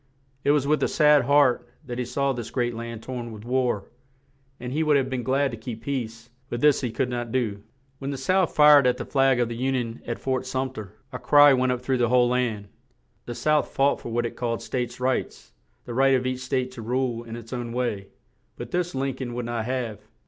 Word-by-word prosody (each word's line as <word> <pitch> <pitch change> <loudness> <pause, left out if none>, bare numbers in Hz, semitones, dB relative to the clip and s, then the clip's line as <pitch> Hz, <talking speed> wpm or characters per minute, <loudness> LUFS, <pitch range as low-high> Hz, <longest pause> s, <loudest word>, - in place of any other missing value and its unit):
It - - +1
was 145 -2 +3
with 150 +1 +2
a - - +3
sad 150 -3 +4
heart 140 -2 +3 0.2
that 125 -2 -5
he 125 - -1
saw 140 +3 0
this 120 -2 -6
great 120 -1 -1
land 115 -1 -7
torn 120 -2 -6
with 110 0 -10
war; 125 -5 0 0.7
and 125 +1 -5
he 155 - 0
would 150 -2 +4
have 135 -1 -1
been 130 -1 -1
glad 135 +2 +1
to 115 - -6
keep 115 0 -7
peace, 115 -3 -4 0.2
but 120 - -3
this 150 +1 +4
he 125 - -1
could 115 +3 -1
not 120 -2 -4
do. 110 -6 -1 0.4
When 135 - -4
the 140 - -3
South 185 +6 +1
fired 150 -3 +7
at 125 - +2
the - - -5
flag 135 -2 +2
of 120 - +2
the 115 0 -5
Un 135 - +1
ion 120 -2 -3
at 120 - -2
Fort 130 -1 -2
Sum 130 0 -2
ter, 105 -5 -8 0.2
a 125 - -4
cry 145 -1 +6
went 130 0 +2
up 125 -1 -2
through 130 0 0
the 120 -2 +2
whole 125 -1 +4
land. 120 -5 -1 0.6
The 120 - -5
South 150 +3 +2
fought 140 +1 +1
for - - -7
what 120 +1 0
it 120 - -5
called 115 -2 -3
"States 125 -1 -3
Rights;" 130 0 -2 0.3
the 120 - -6
right 135 +2 +4
of 130 0 0
each 130 0 -2
state 130 0 -2
to 125 -2 -9
rule 120 0 -1
in 115 -1 -8
its 115 +1 -9
own 120 -2 -4
way; 115 -5 -2 0.5
but - - -7
this 175 -3 -1
Lin 135 0 -1
coln 125 -2 -5
would 120 -1 -3
not 115 -2 -3
have. 120 -4 -3
125 Hz, 235 wpm, -25 LUFS, 120-135 Hz, 0.7 s, fired